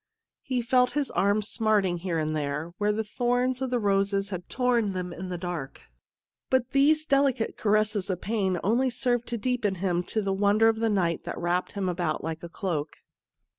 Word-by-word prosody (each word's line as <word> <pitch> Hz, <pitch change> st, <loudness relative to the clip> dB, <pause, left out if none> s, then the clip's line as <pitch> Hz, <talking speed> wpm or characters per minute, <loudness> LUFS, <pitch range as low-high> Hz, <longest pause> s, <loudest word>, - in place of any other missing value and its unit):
He 255 Hz, -2 st, -2 dB
felt 250 Hz, +1 st, +3 dB
his 290 Hz, -2 st, -1 dB
arms 205 Hz, +2 st, +1 dB
smarting 210 Hz, -6 st, +1 dB
here 170 Hz, -1 st, -2 dB
and 155 Hz, 0 st, -1 dB
there, 150 Hz, +3 st, -3 dB
where 210 Hz, 0 st, +2 dB
the 220 Hz, +1 st, -1 dB
thorns 245 Hz, +3 st, 0 dB
of 265 Hz, -, -1 dB
the 250 Hz, -, +1 dB
roses 200 Hz, -1 st, +1 dB
had 180 Hz, -3 st, -6 dB
torn 240 Hz, -5 st, +1 dB
them 180 Hz, -1 st, -4 dB
in 185 Hz, +2 st, -6 dB
the 180 Hz, -, -3 dB
dark, 170 Hz, -6 st, -5 dB, 0.7 s
but 260 Hz, -1 st, +1 dB
these 305 Hz, +3 st, +4 dB
delicate 275 Hz, -5 st, +1 dB
caresses 210 Hz, -2 st, +1 dB
of 185 Hz, -2 st, -1 dB
pain 195 Hz, -3 st, 0 dB
only 240 Hz, +7 st, +2 dB
served 245 Hz, -1 st, -1 dB
to 240 Hz, -, -3 dB
deepen 230 Hz, -4 st, 0 dB
to -, -, -12 dB
him 180 Hz, -2 st, 0 dB
the 200 Hz, -3 st, +1 dB
wonder 205 Hz, +3 st, +3 dB
of 225 Hz, -, 0 dB
the 225 Hz, 0 st, +1 dB
night 175 Hz, -5 st, 0 dB
that -, -, -5 dB
wrapped 175 Hz, +1 st, -1 dB
him 200 Hz, -2 st, -2 dB
about 175 Hz, -3 st, -1 dB
like 160 Hz, 0 st, -4 dB
a 170 Hz, -, -8 dB
cloak. 165 Hz, -5 st, -3 dB
205 Hz, 195 wpm, -27 LUFS, 180-240 Hz, 0.7 s, these